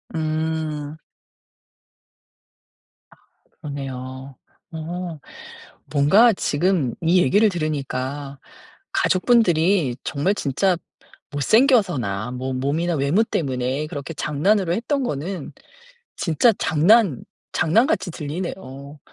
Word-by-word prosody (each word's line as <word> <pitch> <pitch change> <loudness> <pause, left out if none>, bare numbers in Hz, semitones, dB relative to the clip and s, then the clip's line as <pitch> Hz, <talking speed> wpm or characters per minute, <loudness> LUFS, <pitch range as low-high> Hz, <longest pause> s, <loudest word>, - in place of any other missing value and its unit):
음. 155 -1 -2 2.1
아 - - -19 0.5
그러네요. 130 -2 -7 0.4
어 165 0 -5 0.7
뭔가 190 +12 +5
지금 160 -6 0
이 175 +2 +4
얘기를 205 +10 +4
들으니까 140 -4 -4 0.5
가족분들이 180 - +3
정말 180 +9 0
진짜 175 +5 +1 0.5
못생겨서나 145 - +2
뭐 130 +1 -4
몸이나 155 +6 -1
외모 145 +10 +2
때문에 135 - -2
그렇게 145 +2 -6
장난으로 170 +5 +1
했던 270 +6 -1
거는 170 - -4 0.6
진짜 190 +8 +3
장난 175 - +3 0.3
장난같이 220 - +2
들리네요. 145 -3 -6
155 Hz, 205 characters per minute, -22 LUFS, 140-185 Hz, 2.1 s, 뭔가